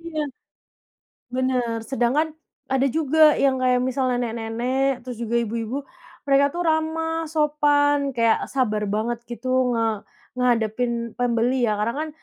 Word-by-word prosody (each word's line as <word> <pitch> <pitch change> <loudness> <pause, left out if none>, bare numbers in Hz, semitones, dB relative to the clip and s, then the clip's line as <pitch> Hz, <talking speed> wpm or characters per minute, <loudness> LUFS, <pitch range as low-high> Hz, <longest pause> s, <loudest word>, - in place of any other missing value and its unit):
Iya. 325 -2 -3 1.0
Bener, 250 -2 -1
sedangkan 270 +6 0 0.4
ada 265 +1 +3
juga 310 +2 +4
yang 265 -2 +2
kayak 250 -1 +3
misal, 260 0 0
nenek-nenek 245 +2 -1
terus 250 -2 -6
juga 235 0 -1
ibu-ibu 230 +4 -3 0.4
mereka 280 0 +4
tuh 350 +1 -2
ramah, 325 +1 0
sopan 290 -2 +2
kayak 230 -1 +3
sabar 215 -6 0
banget 220 +3 -1
gitu 245 +2 -6 0.2
nge 230 -1 +1 0.5
ngehadepin 240 -1 +1 0.3
pembeli 245 +1 +1
ya 210 - +1
karena 225 +3 0
kan - - -7
255 Hz, 130 wpm, -23 LUFS, 235-290 Hz, 1.0 s, juga